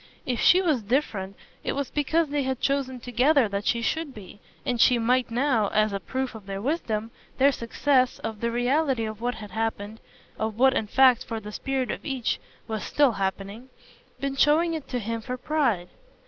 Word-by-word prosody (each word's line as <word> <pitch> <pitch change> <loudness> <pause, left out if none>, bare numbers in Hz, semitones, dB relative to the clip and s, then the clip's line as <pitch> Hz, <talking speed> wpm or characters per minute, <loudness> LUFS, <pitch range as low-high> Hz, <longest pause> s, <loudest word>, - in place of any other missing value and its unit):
If 245 -2 -1
she 370 +1 +5
was 305 -9 +2
different 205 -4 -1 0.3
it - - -1
was 280 -2 -3
because 305 +2 +1
they 290 0 0
had 265 -1 -2
chosen 270 -2 -1
together 250 +2 +3
that 200 +1 -3
she 235 -1 +1
should 310 +3 -2
be, 205 -1 -11 0.3
and 240 -2 0
she 250 - +6
might 245 +2 +2
now, 235 -3 +1
as 215 0 +1
a 195 - -1
proof 260 +8 -3
of 215 -3 -11
their 195 0 -4
wisdom, 225 -4 -2 0.3
their 275 +1 +5
success, 255 +1 +1
of 220 -2 -6
the 235 - +1
reality 250 +1 +1
of 215 0 -6
what 245 +1 -1
had 210 -2 -9
happened 220 0 -3 0.4
of 220 -1 -2
what 265 +2 +5
in 220 - -1
fact, 255 +1 +5
for 225 -1 -4
the 210 0 -9
spirit 265 +2 -2
of - - -6
each, 265 -5 -2 0.3
was 220 -1 -3
still 285 -3 +3
happening 200 +4 -4 0.5
been 275 0 -2
showing 315 +5 +3
it 315 -3 -5
to 250 - -3
him 230 0 -3
for 250 +3 -5
pride. 250 - 0
245 Hz, 195 wpm, -26 LUFS, 220-275 Hz, 0.5 s, she